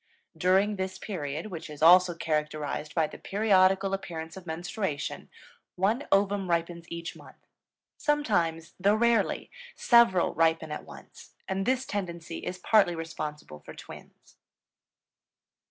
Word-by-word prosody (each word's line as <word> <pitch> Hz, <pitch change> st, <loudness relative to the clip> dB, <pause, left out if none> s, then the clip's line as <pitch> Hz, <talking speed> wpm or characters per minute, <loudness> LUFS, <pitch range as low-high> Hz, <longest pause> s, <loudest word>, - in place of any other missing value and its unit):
During 195 Hz, +3 st, +2 dB
this 190 Hz, 0 st, -3 dB
period, 160 Hz, -1 st, -5 dB
which 160 Hz, -3 st, -7 dB
is 150 Hz, 0 st, -6 dB
also 180 Hz, +1 st, +7 dB
characterized 150 Hz, -1 st, -3 dB
by 165 Hz, -2 st, +3 dB
the -, -, -9 dB
periodical 195 Hz, -1 st, +3 dB
appearance 165 Hz, -4 st, -5 dB
of 185 Hz, -2 st, -11 dB
menstruation, 165 Hz, -1 st, -4 dB, 0.5 s
one 215 Hz, +9 st, 0 dB
ovum 195 Hz, -1 st, +2 dB
ripens 170 Hz, 0 st, -1 dB
each 170 Hz, 0 st, -6 dB
month; -, -, -16 dB, 0.5 s
sometimes, 175 Hz, -, 0 dB
though 200 Hz, +3 st, +3 dB
rarely, 235 Hz, +1 st, +1 dB, 0.2 s
several 235 Hz, -7 st, +4 dB
ripen 160 Hz, -1 st, +1 dB
at 150 Hz, -, -6 dB
once, -, -, -14 dB
and 190 Hz, +1 st, -2 dB
this 260 Hz, 0 st, +1 dB
tendency 170 Hz, -4 st, -5 dB
is 180 Hz, -, -5 dB
partly 195 Hz, -1 st, +3 dB
responsible 155 Hz, -, -6 dB
for -, -, -12 dB
twins. -, -, -14 dB
180 Hz, 125 wpm, -28 LUFS, 160-195 Hz, 0.5 s, also